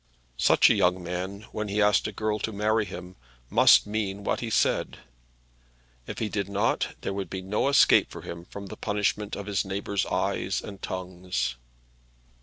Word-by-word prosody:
Such - - +6
a - - +5
young 90 -3 +2
man, 90 +3 -4
when 105 0 -3
he 100 +1 -1
asked 105 0 +4
a - - -4
girl 110 +1 -2
to 110 - -2
marry 110 +1 +1
him, 90 -1 -9 0.3
must - - +7
mean 100 -2 -3
what - - 0
he 120 - -4
said. - - +1 1.1
If - - -6
he 110 - -1
did 100 -2 -3
not 100 +3 0
there - - -3
would 100 -1 -4
be 95 -1 -5
no 105 +7 0
escape 140 - +5
for - - -9
him 85 0 -7
from 100 +2 -9
the 95 - -8
punishment 105 0 -1
of 100 - -6
his 100 -2 0
neighbours' 100 +1 -2
eyes 95 +1 -1
and 100 -1 -9
tongues. 90 -9 -3
100 Hz, 180 wpm, -27 LUFS, 95-105 Hz, 1.1 s, must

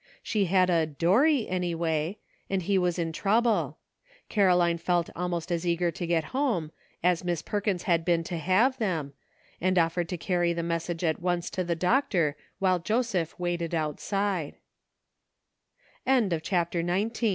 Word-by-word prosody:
She 210 -4 +1
had 185 0 +3
a 165 -2 +2
''Dorry," 215 - +3
any 180 -2 -1
way, 165 +3 -1 0.3
and 195 -2 0
he 195 +2 +2
was 180 -1 0
in 165 -2 -1
trouble. 220 +7 +1 0.5
Caroline 180 -4 +3
felt 175 0 0
almost 175 -1 -3
as 170 -1 0
eager 175 0 +1
to 175 - -5
get 165 -2 +2
home 235 - 0 0.3
as 180 -1 +2
Miss 175 -3 -2
Perkins 205 -3 -1
had 170 -2 +2
been 170 -1 +2
to 170 +1 -4
have 210 - +2
them, 165 -10 -2 0.5
and 185 +1 +2
offered 170 0 +1
to 180 - -3
carry 175 +2 0
the 170 0 -3
message 170 0 -2
at 160 0 0
once 175 -1 -1
to 185 - -1
the 170 -1 -1
doctor, 180 - +1 0.2
while 185 -2 +2
Joseph 210 -3 -1
waite 175 -1 -2
175 Hz, 140 wpm, -28 LUFS, 170-190 Hz, 0.5 s, had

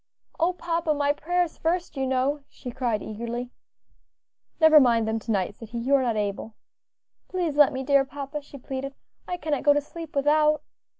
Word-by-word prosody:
"Oh 340 +2 +2
papa! 335 -3 -1
my 285 0 +2
prayers 350 +3 -1
first, 340 0 -1
you 265 -1 -1
know," 265 +3 0
she 250 - -8
cried 235 -4 -1
eagerly. 235 +3 -5 1.1
"Never 315 -2 +8
mind 235 -4 +3
them 220 0 0
to 225 - -4
night," 195 -2 0
said 225 +1 -12
he, 235 - -5
"you 250 +4 0
are 275 - +5
not 240 -3 0
able." 210 +1 -3 0.7
"Please 350 -5 -2
let 295 -1 +6
me, 265 -1 -4
dear 280 0 +4
papa," 280 +2 -6
she 285 0 -12
pleaded; 270 +1 -6 0.3
"I 360 - -3
cannot 295 -4 -2
go 290 - +5
to 290 - +1
sleep 325 +1 -10
without." 300 +2 +3
280 Hz, 185 wpm, -26 LUFS, 245-305 Hz, 1.1 s, Never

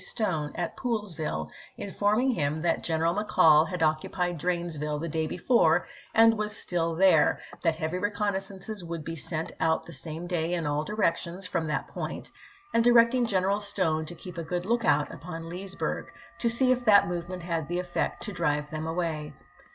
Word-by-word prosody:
Stone 160 - -2
at 175 -1 -3
Poolesville 175 - -3 0.3
informing 210 +6 +1
him 155 - -1
that 175 - +1
General 165 0 +1
McCall 160 -6 +5
had 180 0 -2
occupied 170 +2 0
Dranesville 160 -3 -2
the 165 - -3
day 160 0 -1
before 235 +9 +3 0.3
and 225 0 +7
was 215 0 -2
still 165 -2 -1
there, 175 -4 +5 0.2
that 165 -2 +2
heavy 160 +2 -2
reconnaissances 200 0 -3
would 165 -2 -5
be 165 - -4
sent 160 +1 -3
out 160 0 +2
the 170 - -10
same 160 +1 -5
day 175 -1 -1
in 170 -2 -2
all 145 +1 0
directions 185 -2 -1
from 170 -3 -1
that 155 - -2
point, - - -6 0.4
and 230 - +4
directing 240 +1 +5
General 195 0 +1
Stone 180 -6 0
to 175 - -6
keep 170 +1 -8
a - - -3
good 175 +2 -3
lookout 235 +2 +2
upon 165 -1 -7
Leesbm'g, 190 +2 -4 0.3
to 235 - +2
see 255 +2 +3
if 250 -1 +1
that 210 -3 +6
movement 175 +1 -4
coiburnto 170 0 -3
had 160 -3 -1
the 175 - -2
effect 175 -1 -2
to 210 - -3
drive 150 -4 -1
them 155 0 -4
away. 160 -3 -3
175 Hz, 175 wpm, -28 LUFS, 160-205 Hz, 0.4 s, and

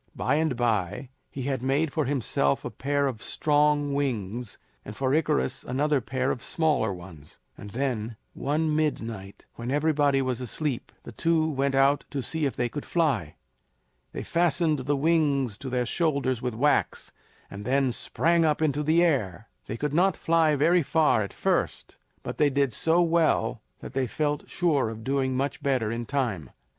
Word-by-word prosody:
By 140 +4 +1
and 155 -4 +1
by 110 0 -1 0.2
he 135 - -6
had 135 -2 -2
made 140 +4 0
for 155 -3 0
himself 115 - 0
a 125 - -4
pair 140 +5 0
of 125 -6 -3
strong 145 -1 +1
wings, 120 -5 -2 0.3
and 105 - -9
for 135 0 0
Icarus 150 -4 0
another 140 +2 0
pair 130 +1 -1
of 120 - -4
smaller 155 - +1
ones; 85 -5 -11 0.2
and 105 - -10
then, 120 -2 -2 0.2
one 150 +2 0
midnight, 115 -10 -3
when 115 +1 -5
everybody 145 -1 +2
was 130 -2 -1
asleep, 130 +1 -3
the - - -9
two 160 +5 +1
went 140 -2 0
out 135 +1 +3
to 135 -2 -3
see 155 +4 -1
if 135 - -5
they 120 - 0
could 145 +4 -6
fly. 135 - 0 0.8
They - - -5
fastened 170 -2 +1
the 140 +3 0
wings 140 -6 +2
to 135 - -6
their 125 -1 0
shoulders 140 -5 0
with 125 -3 -3
wax, 145 +6 +1 0.4
and 100 +1 -7
then 130 +2 +1
sprang 170 +7 +1
up 155 -2 +2
into 150 -2 +1
the 160 +3 +3
air. 115 - 0 0.2
They 110 - -4
could 145 +3 -2
not 180 +2 +3
fly 160 -2 +3
very 170 +5 +4
far 155 -5 +2
at 100 - -4
first, - - -1 0.3
but - - -6
they 150 - +5
did 140 -3 +1
so 165 +8 +3
well 160 -9 +1 0.2
that - - -9
they 135 -1 0
felt 150 +2 -2
sure 150 -9 +1
of 110 0 -8
doing 130 0 0
much 140 +1 -2
better 130 -6 0
in 115 0 -4
time. 115 - -2
140 Hz, 175 wpm, -26 LUFS, 120-150 Hz, 0.8 s, they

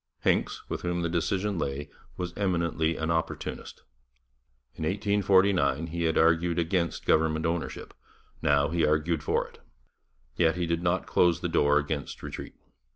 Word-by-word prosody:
Hincks, - - 0
with - - -4
whom 85 -1 -1
the 85 - 0
decision 95 +3 -1
lay, 70 0 -3 0.3
was 90 -1 -4
eminently 85 -4 0
an 80 +1 -1
opportunist. 80 -1 -4 0.9
In - - -7
1849 95 -5 +2
he 85 +1 -3
had 80 - +1
argued 85 +1 +3
against 85 0 -1
government 80 0 +2
ownership; 85 0 -3 0.5
now 70 0 +3
he 85 0 0
argued 75 +1 +1
for - - 0
it. - - -19 0.8
Yet 80 +3 +3
he 90 -1 -1
did 85 0 -1
not 90 +1 0
close 85 -1 +2
the 90 - -1
door 75 -3 +3
against 75 -1 -3
retreat. - - -7
85 Hz, 150 wpm, -28 LUFS, 80-90 Hz, 0.9 s, argued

